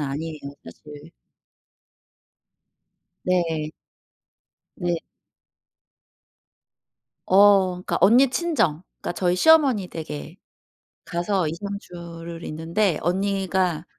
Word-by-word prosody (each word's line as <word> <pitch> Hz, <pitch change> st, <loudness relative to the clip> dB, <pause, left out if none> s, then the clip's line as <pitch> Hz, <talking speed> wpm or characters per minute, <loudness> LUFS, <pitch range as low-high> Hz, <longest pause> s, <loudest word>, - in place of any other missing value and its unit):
아니에요 150 Hz, +3 st, -4 dB, 0.3 s
사실. 150 Hz, -1 st, -12 dB, 2.1 s
네. 165 Hz, -4 st, 0 dB, 1.1 s
네. 175 Hz, -2 st, -1 dB, 2.3 s
어. 200 Hz, 0 st, +6 dB
그러니까 180 Hz, 0 st, -3 dB
언니 245 Hz, +7 st, +6 dB
친정. 255 Hz, -, 0 dB, 0.2 s
그러니까 -, -, -3 dB
저희 180 Hz, 0 st, 0 dB
시어머니 275 Hz, -, +4 dB
댁에 75 Hz, -, -7 dB, 0.7 s
가서 175 Hz, 0 st, -1 dB
2-3 200 Hz, +6 st, -5 dB
주를 170 Hz, -2 st, -9 dB
있는데 165 Hz, +3 st, 0 dB
언니가 190 Hz, -2 st, 0 dB
175 Hz, 165 characters per minute, -23 LUFS, 165-200 Hz, 2.3 s, 어